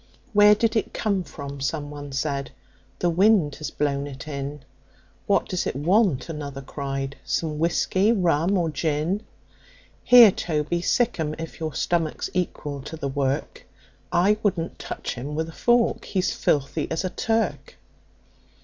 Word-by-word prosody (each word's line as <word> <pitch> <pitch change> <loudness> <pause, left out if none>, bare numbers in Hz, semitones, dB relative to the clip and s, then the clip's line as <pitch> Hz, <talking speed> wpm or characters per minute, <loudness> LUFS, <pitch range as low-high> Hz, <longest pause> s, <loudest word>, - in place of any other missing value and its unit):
"Where 210 0 +7
did 225 +2 0
it 220 - -1
come 200 -4 0
from?" 140 -2 -8
someone 145 0 -4
said. 140 0 -2 0.3
" - - -34
The 175 - +2
wind 185 -4 +4
has 155 - -4
blown 140 -1 -1
it 140 +1 -9
in." 140 0 -5 0.7
"What 200 - +2
does 185 - -2
it - - -3
want?" 175 - +2
another 145 -4 -6
cried. 135 0 -4
"Some 155 -2 -2
whiskey, 185 +5 +2
rum 180 -2 +2
or 165 -3 0
gin?" 155 +6 -1 0.8
"Here, 240 -4 +9
Toby, 165 0 -1
sic 240 +2 +1
'em, 155 -1 -1
if 165 0 -7
your 155 -3 -4
stomach's 165 -3 -1
equal 150 -5 -3
to 155 +4 -8
the 140 -3 -3
work 135 0 -2 0.4
I 195 +5 +3
wouldn't 175 -6 -1
touch - - -5
him 140 +5 -6
with 160 +1 -2
a - - -10
fork, 240 +4 +2
he's 185 -2 0
filthy 145 +2 0
as 165 - -2
a 185 - -2
Turk." 225 0 -1
160 Hz, 155 wpm, -24 LUFS, 145-185 Hz, 0.8 s, Here